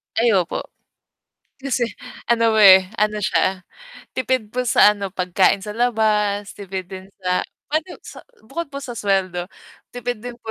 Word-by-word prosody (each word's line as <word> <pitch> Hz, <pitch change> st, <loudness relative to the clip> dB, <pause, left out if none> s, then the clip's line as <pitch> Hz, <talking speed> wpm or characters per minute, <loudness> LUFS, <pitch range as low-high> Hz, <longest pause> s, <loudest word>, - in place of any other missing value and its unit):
Ay 230 Hz, +1 st, +3 dB
opo. 185 Hz, -4 st, 0 dB, 1.0 s
Kasi 270 Hz, -2 st, -2 dB, 0.5 s
ano, 230 Hz, -1 st, +3 dB
eh, 190 Hz, -3 st, +8 dB
ano 210 Hz, 0 st, +1 dB
siya, 185 Hz, -2 st, 0 dB, 0.5 s
tipid 255 Hz, -3 st, 0 dB
po 250 Hz, -, 0 dB
sa 210 Hz, -3 st, +5 dB
ano, 200 Hz, -2 st, -5 dB
pagkain 185 Hz, +1 st, +2 dB
sa 210 Hz, +1 st, -7 dB
labas, 210 Hz, -4 st, +1 dB
tipid 190 Hz, -2 st, -6 dB
din 190 Hz, 0 st, -9 dB
sa 180 Hz, -1 st, 0 dB, 0.3 s
puwede 310 Hz, +4 st, -1 dB, 0.2 s
sa -, -, -11 dB, 0.2 s
bukod 335 Hz, +8 st, -4 dB
po 280 Hz, -, -4 dB
sa 250 Hz, -3 st, -6 dB
suweldo, 185 Hz, -3 st, 0 dB, 0.5 s
tipid 245 Hz, -1 st, -3 dB
din 245 Hz, 0 st, -6 dB
po 220 Hz, -, -6 dB
210 Hz, 150 wpm, -21 LUFS, 190-240 Hz, 1.0 s, eh